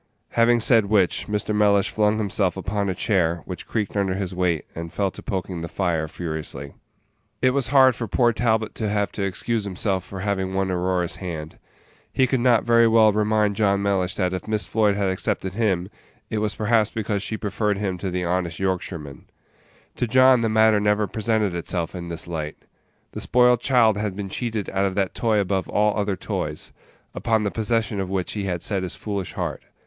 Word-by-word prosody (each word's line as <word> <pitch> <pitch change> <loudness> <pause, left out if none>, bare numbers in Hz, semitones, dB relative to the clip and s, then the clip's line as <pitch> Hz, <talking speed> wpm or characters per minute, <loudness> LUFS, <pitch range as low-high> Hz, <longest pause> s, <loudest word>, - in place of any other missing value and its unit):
Having 120 0 +3
said 115 -2 +4
which, 100 -4 +2
Mr. 105 0 -1
Mellish 105 -1 +3
flung 105 0 +2
himself 100 -3 0
upon 100 +1 -2
a 95 - -2
chair, 85 -4 +1
which 90 -2 -7
creaked 105 -3 -2
under 95 -2 0
his 95 -2 -3
weight, 90 -4 0
and 85 0 -6
fell 100 -2 -1
to - - -11
poking 95 -3 -4
the 85 - -4
fire 85 -3 -1
furiously. 75 -4 -6 0.7
It 130 - +3
was 135 -2 0
hard 130 -1 +6
for 115 0 -5
poor 120 +3 +2
Talbot 110 -2 0
to 110 - -2
have 105 0 0
to - - -5
excuse 105 +3 -1
himself 95 -1 -1
for 95 0 -8
having 95 -2 -1
won 95 -1 0
Aurora's 90 -1 -1
hand. 80 -4 -6 0.5
He 130 - +3
could 130 0 0
not 120 -2 +4
very 115 0 +5
well 110 -2 +5
remind 105 -1 +1
John 100 -1 +2
Mellish 95 -2 0
that 90 -2 0
if 95 - -5
Miss 110 -1 0
Floyd 105 -2 +2
had 100 -1 0
accepted 95 0 -2
him, 95 -5 0 0.4
it 110 - 0
was 105 0 -1
perhaps 110 0 +2
because 105 -2 -2
she 110 +2 -3
preferred 105 0 -1
him 95 -3 -2
to 95 - -3
the 90 0 -2
honest 85 -1 -1
Yorkshireman. 90 -6 -4 0.7
To 120 - 0
John 130 +1 +5
the 115 - +1
matter 110 -1 +4
never 105 +1 +2
presented 110 -2 0
itself 85 0 -3
in 90 -2 -6
this 85 0 -4
light. 80 -3 -4 0.5
The - - -6
spoiled 125 -1 +4
child 120 -6 +3
had 105 -2 -2
been 100 -1 -5
cheated 110 -1 -3
out 95 0 +1
of 95 -1 -2
that 100 -2 0
toy 110 -2 +1
above 95 -2 0
all 105 0 +2
other 100 -2 0
toys, - - -4 0.4
upon 110 -2 0
the 100 - -1
possession 110 -1 0
of 95 -1 -3
which 95 -2 -2
he 105 -2 -3
had 90 -3 -2
set 100 -3 0
his 95 - -4
foolish 100 -4 -4
heart. - - -3
100 Hz, 200 wpm, -23 LUFS, 95-110 Hz, 0.7 s, hard